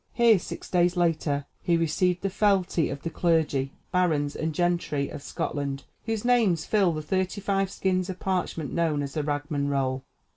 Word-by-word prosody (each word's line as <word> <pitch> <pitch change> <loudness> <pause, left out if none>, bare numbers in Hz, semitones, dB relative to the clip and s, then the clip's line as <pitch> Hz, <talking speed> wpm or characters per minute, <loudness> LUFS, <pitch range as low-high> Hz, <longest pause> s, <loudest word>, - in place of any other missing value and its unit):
Here, 230 -4 +5
six - - -7
days 175 0 +2
later, 155 -4 +1 0.2
he 170 -1 +2
received 175 +2 +1
the 195 - 0
fealty 190 -5 +2
of 140 0 -6
the 165 - -3
clergy, 155 -5 +1 0.2
barons, 155 -6 +1
and 160 0 -1
gentry 170 -4 0
of - - -7
Scotland, 140 -1 -3 0.2
whose 225 0 -2
names 220 -10 +3
fill 200 -5 +3
the 155 -1 -4
thirty 185 +4 -1
five 195 -1 0
skins 185 -1 0
of 185 - -5
parchment 180 -6 -2
known 160 -4 +1
as 140 -1 -5
the 155 - -1
"Ragman 145 0 -1
Roll." 135 -1 0
170 Hz, 175 wpm, -27 LUFS, 145-185 Hz, 0.2 s, Here